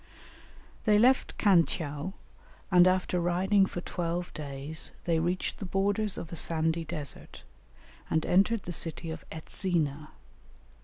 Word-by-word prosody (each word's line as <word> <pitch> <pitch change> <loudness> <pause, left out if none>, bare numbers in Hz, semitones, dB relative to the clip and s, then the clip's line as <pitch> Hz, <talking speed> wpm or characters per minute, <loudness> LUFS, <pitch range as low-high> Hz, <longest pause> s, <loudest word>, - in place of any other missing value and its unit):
They 210 -2 +5
left 250 +4 +3
Khan 190 -5 +5
tcheou, 155 +2 -4 0.6
and 180 -1 +7
after 185 -1 +1
riding 190 +3 +3
for 175 - -5
twelve 175 0 -3
days 145 +1 -3
they 165 -2 +2
reached 175 +3 -1
the 200 - -4
borders 200 +2 0
of 165 - -7
a - - -5
sandy 165 0 +1
desert, 150 -3 -8 0.7
and 160 0 +1
entered 200 +4 +3
the 175 - -5
city 165 0 -2
of 160 -1 -7
Etzina. 155 -3 -2
175 Hz, 135 wpm, -29 LUFS, 160-190 Hz, 0.7 s, and